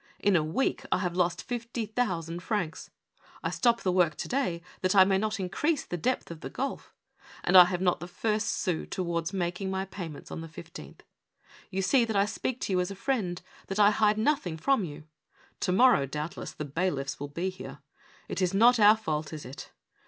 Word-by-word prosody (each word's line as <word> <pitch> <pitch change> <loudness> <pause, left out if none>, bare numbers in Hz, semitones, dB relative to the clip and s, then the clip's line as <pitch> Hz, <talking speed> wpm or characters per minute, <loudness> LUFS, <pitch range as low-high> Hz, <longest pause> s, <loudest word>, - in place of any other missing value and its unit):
In 200 -2 +2
a 160 - +3
week 160 +13 -1
I - - +4
have 180 -2 -2
lost 175 -1 +1
fifty 235 -1 -4
thousand 175 -7 -2
francs. 180 -6 -3 0.5
I - - -1
stop 235 -1 +2
the 185 - +2
work 175 -4 +3
to - - -5
day 185 -11 -1 0.2
that 185 +1 +1
I 190 - +9
may 190 0 +2
not 215 0 -1
increase 285 - -1
the - - -4
depth 245 +2 -1
of 165 -1 -9
the - - -5
gulf, 275 +2 -4 0.5
and 180 - +2
I 180 -1 +11
have 180 0 -2
not 180 -2 +2
the 175 - -7
first 215 +4 -1
sou 180 -5 -1
towards 170 -2 -2
making 185 0 -2
my 190 0 -2
payments 175 -6 -8
on - - -5
the 165 - -7
15th. 170 +2 -11 0.7
Ycu 195 0 -1
see 245 +6 +4
that 225 -2 -2
I 200 0 +4
speak 230 +3 -3
to 195 - -1
you 180 - +2
as 180 - 0
a 195 - -6
friend 195 -6 -2
— - - -24
that 195 - -4
I 205 0 +6
hide 210 0 +3
nothing 220 - 0
from 265 - +2
you. 155 -2 -7 0.6
To 185 - 0
morrow, 220 - +5
doubtless, 150 +4 -5
the 150 - -5
bailiffs 145 -2 -2
will 145 - -4
be 170 +6 -3
here. 185 - -9 0.5
It - - -3
is 185 +1 +1
not 235 +3 +6
our 210 +1 +7
fault, 155 -7 -3
is 155 -2 -7
it? 130 +3 -9
185 Hz, 210 wpm, -28 LUFS, 170-215 Hz, 0.7 s, I